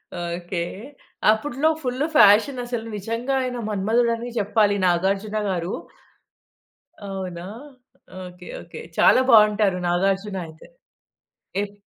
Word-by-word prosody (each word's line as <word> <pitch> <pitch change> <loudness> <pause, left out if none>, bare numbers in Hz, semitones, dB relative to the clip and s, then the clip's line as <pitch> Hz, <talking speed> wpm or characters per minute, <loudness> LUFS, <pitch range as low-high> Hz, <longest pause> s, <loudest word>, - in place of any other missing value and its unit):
Okay. 175 0 -4 0.7
అప్పు‌డులో 275 +7 0
full 255 +1 -1
ఫ్యాషనసలు. 240 +2 +4
నిజంగా 230 +6 -3
ఆయన 250 -1 -3
మన్మధుడని 230 +4 0
జెప్పాలి 210 -1 +2
'నాగార్జున' 195 +4 +1
గారు. 175 -1 -2 1.4
అవునా? 185 -3 -6 0.8
ఓకే. 180 0 -12
ఓకే. 170 - -10 0.2
చాలా 255 - +6
బావుంటారు 210 -3 +5
నాగార్జున 195 +3 0
అయితే. 160 0 -15 1.0
ఎప్ 205 0 -9
205 Hz, 90 wpm, -23 LUFS, 180-230 Hz, 1.4 s, చాలా